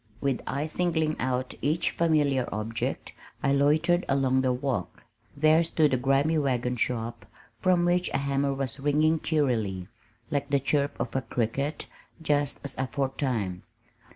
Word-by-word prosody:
With 135 -1 0
eyes 145 +3 -2
singling 160 -3 +1
out 130 0 -1
each 155 +4 +1
familiar 145 -6 +2
object 110 +2 -3 0.3
I 135 - +3
loitered 155 +5 +3
along 135 -1 +2
the 130 -1 +2
walk. 125 - -3 0.3
There 155 +3 +5
stood 155 -3 +2
the 130 - +2
grimy 135 +5 +2
wagon 125 -3 0
shop 115 -2 -2 0.4
from 180 -2 +3
which 175 0 +2
a - - 0
hammer 140 0 0
was 135 -1 -3
ringing 155 +3 +2
cheerily, 110 - 0 0.4
like 145 -1 -1
the 140 0 +3
chirp 140 +1 0
of - - -3
a 135 - +1
cricket, 135 +6 -2 0.3
just 145 -3 0
as 140 -2 -5
aforetime. 130 -8 -2
140 Hz, 145 wpm, -27 LUFS, 125-155 Hz, 0.4 s, There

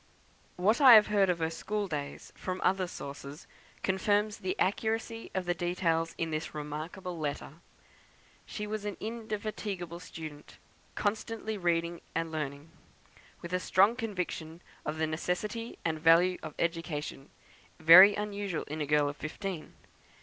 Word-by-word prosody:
What 210 +9 +2
I 255 -4 +11
have 210 -1 +7
heard 195 -2 +4
of 180 - +2
her 160 -1 -1
school 205 +5 -3
days 145 -4 -6
from 185 0 -4
other 185 -1 +2
sources, 140 0 -8 0.4
confirms 205 +2 +1
the 185 0 -2
accuracy 225 +3 -1
of 185 -1 -1
the 175 - +1
details 170 -2 0
in 165 -1 -2
this 155 0 -4
remarkable 155 +4 -5
letter. 150 0 -4 0.9
She 210 - -5
was 215 0 -4
an 205 -2 -4
indefatigable 210 -5 -4
student: 155 -4 -9 0.4
constantly 220 +1 -2
reading 170 -2 0
and 165 0 -1
learning; 150 0 -5 0.7
with 170 +1 -6
a 180 - +2
strong 195 +5 +4
conviction 180 -7 -4 0.2
of 150 +1 -2
the 160 - +1
necessity 180 +8 -3
and 160 -1 0
value 170 +3 +5
of 155 -2 -8
education, 165 -4 -3 0.5
very 180 +6 +10
unusual 205 -4 -3
in 155 +2 -5
a 145 - -2
girl 150 0 +3
of 145 0 -5
fifteen. 165 +1 -5
175 Hz, 140 wpm, -30 LUFS, 160-205 Hz, 0.9 s, I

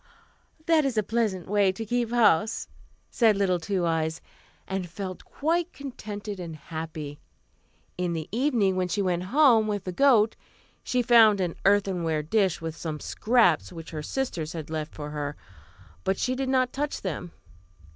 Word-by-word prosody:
"That 325 -2 +4
is 265 -5 -1
a 215 - +3
pleasant 210 -4 -1
way 200 -1 +3
to 225 +4 -6
keep 240 +1 0
house," 220 -3 +3 0.4
said 220 -4 +4
little 185 -3 +2
Two 180 +1 -1
Eyes, 160 -1 0 0.5
and 190 -2 -3
felt 185 +1 -6
quite 335 +4 -1
contented 210 -7 -7
and 170 -3 -6
happy. 155 -1 -7 0.8
In 180 -1 0
the 160 -2 -4
evening, 230 -5 +2
when 185 -1 0
she 195 +3 -1
went 180 -1 0
home 240 -2 +5
with 205 -2 -2
the 185 - -4
goat, 225 0 +4 0.5
she 250 -1 0
found 225 -4 +6
an 175 -3 -1
earthenware 185 -6 +2
dish 195 +2 +1
with 165 -1 -4
some 155 -2 -5
scraps 215 -8 +2
which 165 -2 -9
her 155 -2 -4
sisters 170 - -3
had 160 -2 -6
left 155 -1 -4
for 150 -1 -6
her, 145 -1 -4 0.7
but 190 - 0
she 255 - 0
did 260 0 -2
not 255 -1 +2
touch 290 +2 -3
them. 175 -2 -4
195 Hz, 165 wpm, -26 LUFS, 165-235 Hz, 0.8 s, found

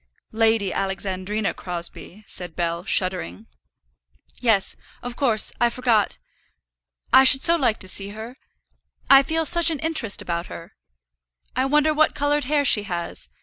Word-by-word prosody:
"Lady 220 -3 +1
Alexandrina 195 +2 -3
Crosbie," 175 +3 -7
said 175 -4 -7
Bell, 170 0 -3
shuddering. 180 - -2 0.9
"Yes, 225 -5 +1 0.3
of 245 -1 -6
course; 235 -6 +1
I 240 - +4
forgot. 235 -4 0 1.0
I 265 - +8
should 270 0 +8
so 335 - +6
like 250 -9 0
to 190 - 0
see 195 +1 -2
her. 220 +4 -9 0.8
I 275 0 +9
feel 320 +3 -2
such 340 0 +3
an 320 - -2
interest 310 -9 -2
about 170 0 -4
her. 165 - -11 0.8
I 255 +2 0
wonder 300 +2 +2
what 310 +1 +1
coloured 290 -1 0
hair 290 +1 0
she 215 - +5
has. 175 -4 -6
225 Hz, 145 wpm, -22 LUFS, 190-275 Hz, 1.0 s, I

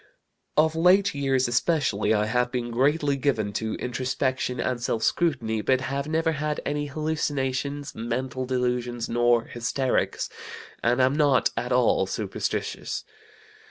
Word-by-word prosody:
Of 160 +1 +4
late 185 +4 +4
years 135 -3 +1
especially 120 - +1
I 105 -1 +3
have 125 +3 0
been 120 -2 -3
greatly 140 +4 +2
given 115 -7 0
to 110 +1 -2
introspection 130 0 -2
and 125 -2 -1
self 115 -2 -1
scrutiny, 120 -10 +1
but 130 +4 +2
have 140 +2 -3
never 160 +1 +1
had 150 0 -2
any 145 0 -1
hallucinations, 145 -2 -2
mental 130 +3 -3
delusions, 125 -2 -1
nor 120 -1 +3
hysterics, 120 +3 -1 0.5
and 120 +2 +2
am 130 +1 +3
not 145 -4 +3
at - - -3
all - - +3
superstitious. - - -3
130 Hz, 130 wpm, -26 LUFS, 120-145 Hz, 0.5 s, Of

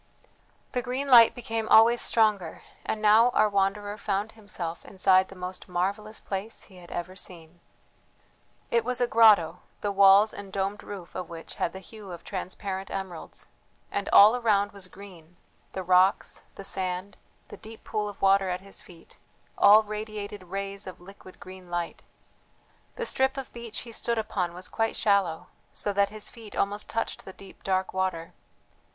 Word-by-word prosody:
The 250 - -1
green 255 +3 -3
light 235 -3 +8
became 225 -2 -3
always 230 +2 +6
stronger; 210 -7 +1 0.2
and 215 0 -3
now 220 +3 +6
our 215 - +5
wanderer 205 +1 -1
found 205 +1 -2
himself 185 -6 -7
inside 190 -1 +3
the 195 - -13
most 180 0 -7
marvellous 200 +5 -2
place 200 +3 -5
he 190 - -14
had 175 -1 -14
ever 175 +2 -5
seen. 175 -3 -10 1.1
It 235 -1 +3
was 250 +1 -2
a 245 - +3
grotto, 210 -8 +5 0.2
the 205 - -1
walls 200 +2 +6
and 200 -1 -9
domed 195 +1 -2
roof 190 -4 -9
of 185 - -6
which 165 -1 -9
had - - +1
the - - -9
hue 205 0 -11
of 175 - -9
transparent 190 0 -5
emeralds; 190 -4 -7 0.4
and 200 - -2
all 210 +4 +8
around 205 -4 +2
was 195 -2 -9
green 180 -3 -14 0.4
the 190 - -4
rocks, 185 +2 +3
the 195 - -9
sand, 185 0 -2 0.3
the - - -10
deep 220 0 -12
pool 210 -1 -2
of 205 - -11
water 195 -1 +4
at 180 0 -3
his 195 0 -9
feet, 170 -2 -17 0.4
all 210 +2 +7
radiated 210 -2 -6
rays 195 +2 -5
of 185 - -9
liquid 185 0 -14
green 185 -1 -12
light. 175 -1 -4 0.9
The 475 - -3
strip 265 -8 +1
of 270 - -6
beach 235 -3 -6
he 235 - -10
stood 235 +1 -1
upon 180 -5 -2
was 185 +1 -7
quite 225 0 -1
shallow, 195 -6 +1 0.2
so 205 - -2
that 200 0 +2
his 215 0 -5
feet 225 -3 -12
almost 205 +1 -2
touched 225 - -3
the 190 - -10
deep 195 0 -15
dark 190 -1 -1
water. 185 -3 -2
200 Hz, 170 wpm, -27 LUFS, 185-215 Hz, 1.1 s, light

